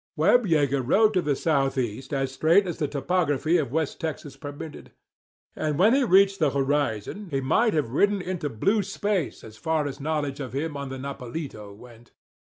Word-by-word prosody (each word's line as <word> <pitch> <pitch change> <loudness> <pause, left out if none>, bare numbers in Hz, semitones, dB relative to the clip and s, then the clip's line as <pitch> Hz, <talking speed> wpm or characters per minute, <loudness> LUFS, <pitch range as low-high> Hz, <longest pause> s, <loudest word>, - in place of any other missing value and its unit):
Webb 245 -3 +4
Yeager 140 -5 +2
rode 215 - +4
to 185 - +2
the 145 -4 0
southeast 135 -5 -1
as 135 -2 -1
straight 165 +8 +3
as 175 - -5
the 150 - 0
topography 155 +2 +1
of 140 -7 -2
West 160 0 -1
Texas 150 -3 -5
permitted. 145 +2 -9 0.6
And 150 -2 -1
when 210 +7 +5
he 275 +1 +3
reached 195 -2 +4
the 155 -4 +3
horizon 140 - -1
he 135 -3 -1
might 215 - +2
have 145 -7 0
ridden 205 +9 +3
on 195 - -4
into 180 -5 -3
blue 195 - +1
space 200 -3 -2
as 110 -1 -12
far 160 +3 0
as 140 0 -5
knowledge 145 -2 -2
of 130 -4 -6
him 150 +2 -3
on 140 -1 -5
the 130 - -6
Nopalito 130 -4 -6
went. 120 +1 -16
145 Hz, 190 wpm, -25 LUFS, 135-180 Hz, 0.6 s, when